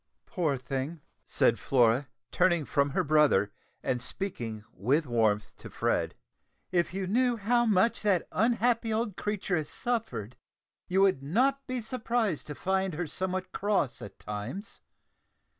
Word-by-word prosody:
"Poor 160 -9 0
thing," 135 +5 -4 0.3
said - - +2
Flora, 125 +1 +3 0.2
turning 175 -4 +3
from 140 +1 +1
her 140 - 0
brother, 145 -10 +4 0.3
and 125 -2 0
speaking 120 - -4
with 135 - +1
warmth 110 -4 +1
to - - -10
Fred; - - 0 0.6
"if 175 -2 +1
you 190 +1 -2
knew 240 +5 +2
how 240 +3 +2
much 215 +2 +3
that 200 -5 +2
unhappy 230 +1 +2
old 215 -3 -1
creature 205 -3 -1
has 155 -2 -3
suffered, 225 - -3 0.5
you 190 +2 +2
would 190 -8 +4
not 260 - +1
be 255 0 -2
surprised 230 - -1
to 150 - -5
find 190 0 0
her 175 +3 -2
somewhat 185 +3 -3
cross 200 -10 0
at 100 - -9
times. 110 - -6
180 Hz, 140 wpm, -29 LUFS, 135-215 Hz, 0.6 s, brother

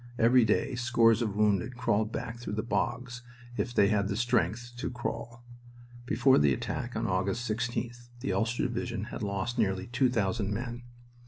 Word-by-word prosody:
Every 120 +1 +5
day 110 +4 +1
scores 120 -2 +3
of 105 -4 -1
wounded 105 +3 +1
crawled 110 -3 +1
back 115 -1 -5
through 120 -4 -5
the 110 - -1
bogs, 125 +1 -2 0.3
if 120 - -1
they 100 -4 +4
had 105 -2 +2
the 100 - -2
strength 120 0 0
to - - -3
crawl. 120 -1 -5 0.6
Before 125 +4 +4
the 75 -2 +4
attack 120 - -4
on 115 +1 -1
August 100 +4 -1
16th 120 +2 -3
the 135 - -2
Ulster 115 +2 0
Division 120 -3 -2
had - - -5
lost 105 +4 -2
nearly 95 -3 +1
two 125 +2 +2
thousand 105 -3 0
men. 120 +3 -4
115 Hz, 170 wpm, -29 LUFS, 105-120 Hz, 0.6 s, Every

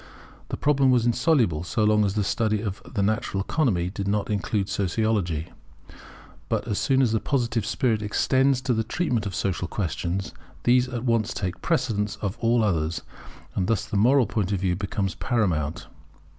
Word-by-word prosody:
The - - -3
problem 140 -2 +3
was 125 -2 +3
insoluble, 120 - +2
so 105 +4 -1
long 105 0 +4
as 100 0 -1
the 105 - +1
study 110 +1 0
of 100 -2 -4
the 100 -4 0
natural 100 -2 0
economy 100 - 0
did 100 0 -4
not 105 +1 0
include 100 0 -1
Sociology. 100 -4 -1 1.0
But - - -1
as 105 - -1
soon 135 -1 +3
as 120 - +2
the 110 - +2
Positive 120 -4 0
spirit 115 -4 +1
extends 130 +5 +2
to 130 -1 0
the 110 -1 0
treatment 120 -4 -1
of 95 - -5
social 90 -2 -1
questions, 90 0 -3 0.3
these 125 +1 +4
at 120 -2 -4
once 115 -3 +1
take 95 -3 -3
precedence 105 -10 0
of 100 0 -3
all 115 0 +2
others, 85 -5 0 0.5
and 90 -2 -1
thus 115 -4 0
the - - -5
moral 125 +6 +4
point 105 -4 -1
of 100 - 0
view 90 -2 +1
becomes 95 -1 -2
paramount. 85 - -1
105 Hz, 175 wpm, -25 LUFS, 95-120 Hz, 1.0 s, long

